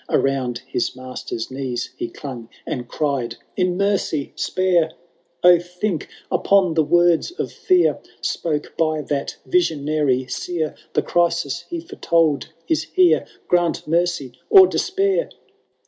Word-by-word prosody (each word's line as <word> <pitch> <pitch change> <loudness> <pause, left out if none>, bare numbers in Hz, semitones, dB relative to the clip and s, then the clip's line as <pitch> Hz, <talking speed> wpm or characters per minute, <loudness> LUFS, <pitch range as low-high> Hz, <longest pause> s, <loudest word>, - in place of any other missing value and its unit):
Around 130 -3 0
his 120 - -2
master's 130 -2 -6
knees 130 -2 -4
he 355 0 -4
clung, 125 - -8 0.2
And 120 -2 -4
cried, 130 -5 -2 0.2
In 180 -1 +1
mercy, 200 -7 0
spare! 175 -4 +1 0.5
O, 175 -1 +8
think 180 0 -3 0.2
upon 195 -4 +3
the 160 -1 +3
words 175 +1 +3
of 350 +4 -4
fear 365 -1 +2 0.2
Spoke 150 -3 -2
by 155 -2 +1
that 140 -1 -3
visionary 150 - +1
Seer, 160 +4 -3 0.2
The - - +2
crisis 170 -5 0
he 340 -1 -4
foretold 165 - +1 0.2
ia 320 - +2
here^— 365 +1 +2 0.2
Grant 175 -3 +1
mercy, 165 -5 0
— - - -41
or 390 -3 +10
despair 390 +5 0
165 Hz, 130 wpm, -21 LUFS, 140-185 Hz, 0.5 s, or